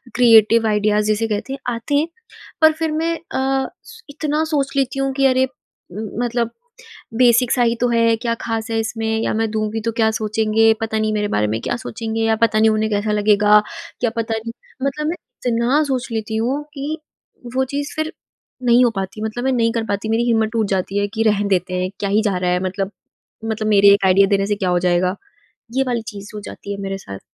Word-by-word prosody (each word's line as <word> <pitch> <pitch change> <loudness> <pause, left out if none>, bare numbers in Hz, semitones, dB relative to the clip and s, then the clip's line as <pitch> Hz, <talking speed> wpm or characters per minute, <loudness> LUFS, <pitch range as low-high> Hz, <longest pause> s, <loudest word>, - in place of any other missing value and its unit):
Creative 230 -2 +6
ideas 210 0 +2
जिसे 215 +1 +1
कहते 215 +5 -3
हैं 275 - -6 0.2
आते 230 +5 -3
हैं। 300 +3 +2 0.5
पर 315 - +7
फिर 320 0 -2
मैं 325 +2 0 0.2
अ, 265 0 0 0.4
इतना 300 +1 -1
सोच 275 -2 0
लेती 270 0 0
हूँ 270 0 0
कि 275 0 +1
अरे! 260 0 +3 0.5
मतलब 235 +3 -2 0.7
बेसिक 245 -1 +4
सा 250 - +2
ही 235 0 +2
तो 245 - +3
है, 230 -1 +3
क्या 230 0 -1
ख़ास 225 0 -3
है 225 - 0
इसमें 225 0 -3
या - - 0
मैं 225 0 0
दूँगी 215 0 -2
तो 230 - +1
क्या 220 -1 +3
सोचेंगे। 220 +1 +2
पता 220 -1 -1
नहीं 215 0 0
मेरे 210 -1 0
बारे 105 0 +2
में 110 +2 -1
क्या 240 - -2
सोचेंगे? 225 -1 -4
या 225 0 +2
पता 215 -1 +3
नहीं 220 0 +5
उन्हें 215 0 0
कैसा 210 +1 0
लगेगा? 210 0 +5 0.4
क्या 240 - +1
पता 225 -1 -1
नहीं 230 +1 -6 0.3
मतलब 300 +2 -2
मैं 330 - -1 0.3
इतना 240 +5 +2
सोच 265 -3 -2
लेती 220 0 -3
हूँ 260 +6 -1
कि 290 +2 -4 0.6
वो 265 - +3
चीज़ 285 +2 -4
फिर 315 +2 -2 0.5
नहीं 245 0 +5
हो 240 - +2
पाती, 195 +2 -4
मतलब 220 +3 -3
मैं 265 - +1
नहीं 230 -2 +2
कर 230 - -1
पाती। 200 +2 -2
मेरी 225 +2 +2
हिम्मत 225 -2 +2
टूट 220 -3 +1
जाती 195 +1 -1
है 205 - 0
कि 225 0 0
रहने 205 -1 +1
देते 185 -1 0
हैं 185 - -1
क्या 200 - -1
ही 210 +2 +3
जा 200 -4 0
रहा 180 0 0
है। 180 - +1
मतलब 190 +1 -2 0.5
मतलब 220 -1 -2
मेरे 200 -1 +7
एक 200 -1 +2
आइडिया 195 +1 +5
देने 195 0 +1
से 205 - 0
क्या 190 -3 -1
हो 180 0 +2
जाएगा? 180 +2 +1 0.6
ये 270 - +4
वाली 240 -2 0
चीज़ 200 0 -9
हो 210 - -5
जाती 200 - -8
है - - -6
मेरे 195 0 -3
साथ। 100 - -9
225 Hz, 215 wpm, -20 LUFS, 210-245 Hz, 0.7 s, पर